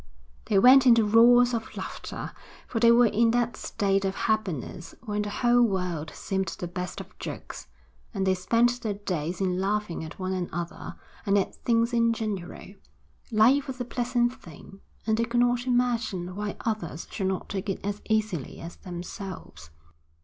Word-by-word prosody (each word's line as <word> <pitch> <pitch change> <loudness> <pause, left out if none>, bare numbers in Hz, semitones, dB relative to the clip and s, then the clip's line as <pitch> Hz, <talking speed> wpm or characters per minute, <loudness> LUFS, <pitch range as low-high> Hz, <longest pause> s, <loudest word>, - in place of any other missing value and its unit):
They 210 -3 +2
went 255 +5 +7
into 230 -2 +6
roars 240 +3 +6
of 225 -1 -4
laughter, - - -6 0.3
for 230 - -3
they 235 0 +6
were 240 +1 +6
in 230 +1 +3
that 240 -1 0
state 195 -2 0
of 195 0 -1
happiness 190 - -2
when 210 -2 -1
the 210 - -3
whole 240 +3 +3
world 180 -8 0
seemed 190 0 -2
the 175 - -5
best 180 +1 -5
of - - -11
jokes, - - -7 0.4
and 195 -4 -2
they 190 - +3
spent 235 +6 +2
their 215 -4 -2
days 180 -4 -3
in 185 -1 0
laughing 205 -4 -1
at 160 - -9
one 185 0 -2
another 175 -2 -5 0.3
and 200 -1 +2
at 195 - 0
things 230 0 +1
in 230 -1 +3
general. 210 -6 -5 0.6
Life 240 +6 +4
was 260 -1 -6
a 245 - -2
pleasant 240 0 0
thing, 180 - -14 0.3
and 220 0 +1
they 230 - +2
could 240 +1 +1
not 245 +1 +1
imagine 230 -8 0
why 205 0 -4
others 195 -8 -3
should 195 - -2
not 190 -1 -2
take 195 0 -4
it 195 - -4
as 205 0 -3
easily 215 - -1
as 170 +1 -9
themselves. 180 - -8
210 Hz, 170 wpm, -27 LUFS, 185-235 Hz, 0.6 s, went